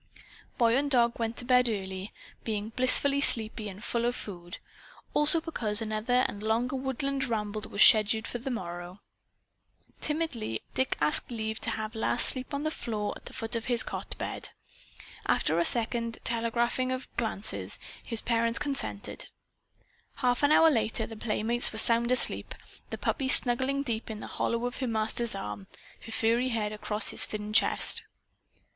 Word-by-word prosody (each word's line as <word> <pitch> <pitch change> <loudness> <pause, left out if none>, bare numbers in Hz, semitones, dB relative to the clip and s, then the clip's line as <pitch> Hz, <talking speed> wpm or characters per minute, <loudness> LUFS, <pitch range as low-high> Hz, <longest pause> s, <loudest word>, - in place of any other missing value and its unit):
Boy 235 -2 +3
and 285 +2 +1
dog 235 -3 +3
went 230 0 -2
to 245 - -1
bed 250 -1 +4
early, 190 -2 -5 0.3
being 215 -1 -3
blissfully 265 +4 +4
sleepy 220 -4 +2
and 195 +2 -11
full 235 -1 -1
of 240 +1 0
food 175 -3 -8 0.6
also 295 +3 +7
because 230 -10 -2
another 225 +3 0
and 205 - -8
longer 230 +4 0
woodland 265 +1 -2
ramble 215 -3 -3
was 205 - +4
scheduled 220 0 +6
for 240 - -5
the 265 +3 -5
morrow. 175 -4 -6 1.0
Timidly 285 - -2
Dick 260 - -1
asked 150 0 +3
leave 220 -2 -4
to - - -1
have 215 0 -4
Lass 225 +2 +1
sleep 255 -1 0
on 285 0 -3
the 310 - -1
foot 225 -1 -5
of 230 - -3
his 240 -2 +4
cot - - -6
bed. - - -4 0.8
After 160 +2 +1
a 170 - +2
second 230 -1 +2
telegraphing 235 +2 0
of 255 0 -5
glances, 195 - -3 0.3
his 230 -2 -3
parents 230 0 +1
consented. 285 -2 -2 0.9
Half 245 -1 0
an 290 0 +3
hour 325 +1 +6
later 225 -3 0
the 225 - -9
playmates 225 +2 +1
were 220 - -8
sound 235 +2 +4
asleep, 255 - +3 0.3
the - - -5
puppy 265 -2 -1
snuggling 265 +2 +2
deep 230 -4 -4
in 215 -1 -6
the - - -7
hollow 235 +1 -2
of 245 - -4
her 260 - -2
master's 220 0 -1
arm, 105 - -6 0.4
her - - -8
furry 230 +3 +1
head 215 -3 -2
across 210 0 -1
his - - +3
thin 210 0 -6
chest. - - +2
230 Hz, 160 wpm, -28 LUFS, 215-250 Hz, 1.0 s, also